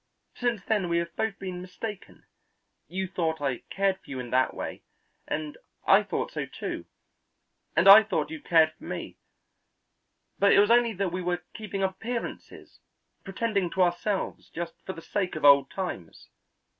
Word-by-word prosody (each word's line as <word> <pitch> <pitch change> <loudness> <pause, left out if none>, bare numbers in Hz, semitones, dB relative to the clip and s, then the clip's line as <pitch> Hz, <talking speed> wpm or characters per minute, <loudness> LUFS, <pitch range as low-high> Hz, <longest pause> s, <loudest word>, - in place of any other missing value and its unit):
Since 240 -4 -1
then 205 -5 0
we 170 - +2
have 170 0 -3
both 220 -3 -1
been 185 -2 -6
mistaken; 195 +3 -8 0.6
you 190 +1 -3
thought 165 -3 -1
I 135 -4 -1
cared 195 -1 0
for - - -21
you 135 -2 -5
in 120 -1 -6
that 130 0 +3
way, - - -5 0.5
and 150 -1 -4 0.3
I - - +7
thought - - -3
so, - - -4
too, - - -5 0.9
and 165 +4 +4
I 200 +3 +12
thought 220 +7 -2
you 310 -1 -6
cared 160 - +4
for - - -20
me; - - -6 1.2
but 200 0 +5
it - - +6
was 205 +2 +5
only 235 -1 +4
that 195 -2 -1
we 185 +1 -3
were 175 -1 -2
keeping 200 -2 -4
up 190 - +2
appearances, 235 +3 -6 0.4
pretending 195 -2 -1
to 190 - +3
ourselves 180 +3 -1
just 170 0 -5
for 190 - -3
the 165 - -11
sake 190 -5 -2
of 155 - -2
old 140 -1 +7
times. 180 - -6
185 Hz, 170 wpm, -27 LUFS, 165-205 Hz, 1.2 s, I